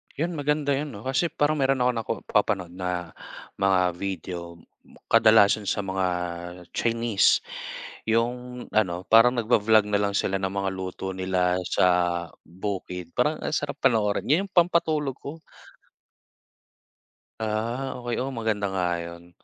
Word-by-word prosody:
Yun, 165 +5 -1
maganda 145 0 0
yun 140 -2 -2
'no 100 - -9
kasi 135 +6 +1
parang 150 -1 0
meron 135 -2 +2
akong 125 0 +2
nako 115 - -4
papanood 95 -4 0
na 90 -2 -4 0.5
mga 95 -1 +3 0.2
video, 95 -2 -4 0.7
kadalasan 110 -2 +5
sa 105 - 0
mga 95 -1 -1 0.6
Chinese. 115 -3 +2 0.6
Yung 125 +2 -1
ano, 90 -5 +1
parang 115 +2 +7
nagva-vlog 110 -3 +3
na 105 - +2
lang 100 0 0
sila 95 -1 0
ng 95 0 -3
mga 100 -1 -1
luto 95 0 -5
nila 90 -1 +1
sa 85 +1 +3 0.6
bukid. 90 -1 -5
Parang 150 +5 +1
ang 155 - -2
sarap 145 -1 -3
panoorin. 110 -5 +1
Yun 170 +8 +3
yung 200 - -16
pampatulog 160 -6 +2
ko. 155 +4 -8 2.0
Ah, 115 +5 -2
okey. 120 -1 -3
Oo, 135 +1 -2
maganda 110 -3 -1
nga 90 -2 0
'yon. 85 0 -9
110 Hz, 135 wpm, -25 LUFS, 95-130 Hz, 2.0 s, parang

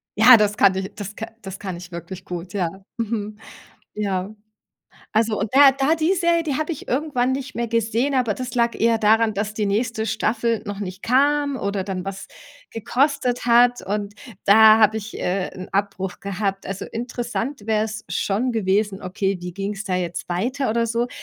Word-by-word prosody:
ja, 225 +3 +8
das 210 -1 +1
kann 190 -1 +5
ich 190 0 -4
das 205 0 -7
ka 225 - -5
das 195 -1 -8
kann 190 -3 -5
ich 175 +1 -11
wirklich 175 +2 -8
gut, 175 +1 -6
ja. 185 -5 0 0.3
Mhm. 215 -2 -3 0.6
Ja. 200 -1 -2 0.8
Also, 220 0 +1
und 205 0 -2
da 275 0 +8
da 275 +4 +1
die 325 +4 +2
Serie, 340 -2 +2
die 295 -4 -1
habe 310 +2 -2
ich 300 - -8
irgendwann 260 -2 0
nicht 265 -1 -4
mehr 235 0 -1
gesehen, 230 +4 0
aber 250 -4 +2
das 250 +3 -6
lag 235 -1 +1
eher 230 0 +3
daran, 220 0 +3
dass 205 +1 -2
die 210 0 -1
nächste 220 +2 -1
Staffel 225 +1 0
noch 205 -1 -5
nicht 190 -1 -6
kam 285 +3 +2
oder 200 -4 -2
dann 185 -2 -4
was 195 0 -6 0.4
gekostet 250 +2 0
hat. 245 +1 +4
Und 205 +1 -3 0.3
da 220 +2 +8
habe 215 0 +4
ich, 215 0 -6
äh, 185 +1 -1
'n 185 0 -8
Abbruch 195 -2 -2
gehabt. 195 0 -3
Also, 195 0 -5
interessant 240 0 -4
wäre 220 -1 +2
es 220 0 -6
schon 205 +7 -1
gewesen: 205 -2 0
„Okay, 195 +1 -1
wie 180 0 -6
ging 200 +3 -4
's 195 - -5
da 185 - -2
jetzt 175 -1 -4
weiter 245 +9 -1
oder 230 +1 +1
so?“ 235 +2 -1
215 Hz, 190 wpm, -22 LUFS, 195-245 Hz, 0.8 s, ja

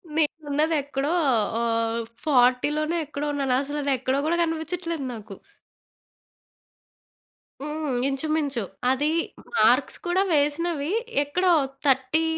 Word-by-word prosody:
నేనున్నది 310 0 +1
ఎక్కడో 280 +2 -2 0.5
ఆ - - 0 0.6
40 290 +4 +2
ఎక్కడో 290 0 -5
ఉన్నాను. 275 -3 0
అసలది 285 0 -2
ఎక్కడో 260 +2 0
కూడా 340 +2 +1
కనిపించట్లేదు 330 0 -3
నాకు. 210 -3 -9 2.3
హ్మ్. 300 -1 -3 0.2
ఇంచుమించు. 280 -3 -1 0.3
అది 290 +3 +1 0.5
మార్క్స్ - - +3
కూడా 355 +2 +2
వేసినవి, 295 +1 0 0.3
ఎక్కడో 360 +6 +1 0.3
30 265 +3 +2
295 Hz, 90 wpm, -25 LUFS, 275-320 Hz, 2.3 s, మార్క్స్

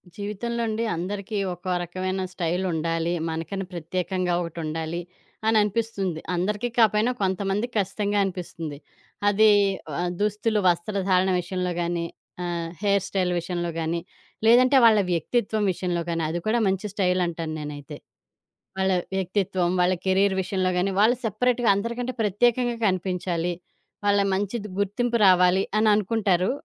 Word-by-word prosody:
జీవితంలో 210 +4 -3
అండి 220 +1 -1
అందరికీ 200 +4 -4 0.2
ఒక్కో 180 +1 -5
రకమైన 185 +2 -3
స్టైలుండాలి. 170 -1 -1 0.2
మనకని 165 +4 -4
ప్రత్యేకంగా 180 +2 -2
ఒకటుండాలి 165 0 -4 0.5
అననిపిస్తుంది. 210 -5 +1 0.2
అందరికీ 210 +6 -1
కాపోయినా 220 +1 +4
కొంతమంది 195 +3 0
కచ్చితంగా 205 0 0
అనిపిస్తుంది. 170 -5 -5 0.5
అది 215 +2 +5 0.5
ఆ - - 0 0.2
దుస్తులు 210 +1 +1
వస్త్రధారణ 185 +1 +2
విషయంలో 180 +1 -2
గానీ 170 0 -1 0.4
ఆహ్, 170 -1 -3
హెయిర్ 200 -2 +2
స్టైల్ 185 -3 0
విషయంలో 175 0 -3
గానీ, 165 +1 -1 0.5
లేదంటే 250 +4 +6
వాళ్ళ 220 -2 +6
వ్యక్తిత్వం 210 +5 0
విషయంలో 175 -1 -2
గానీ 165 -1 -1
అది 170 +2 -2
కూడా 225 +2 +2
మంచి 195 +2 0
స్టైల్ 185 -2 +1
అంటాను 165 -2 -4
నేనైతే. 145 -2 -7 0.8
వాళ్ళ 190 0 +2 0.3
వ్యక్తిత్వం, 185 -1 0
వాళ్ళ 180 +1 +3
కెరీర్ 190 +1 +3
విషయంలో 185 0 0
గాని 190 +2 +1
వాళ్ళు 230 +4 +5
సెపరేట్‌గా 240 +2 +1
అందరికంటే 235 +5 -3
ప్రత్యేకంగా 240 +4 +2
కనిపించాలి. 180 -2 -1 0.5
వాళ్ళ 205 0 +4
మంచిది 205 +2 -2
గుర్తింపు 235 +4 0
రావాలి 180 0 +5 0.2
అననుకుంటారు. 210 -3 +2
190 Hz, 120 wpm, -25 LUFS, 175-210 Hz, 0.8 s, లేదంటే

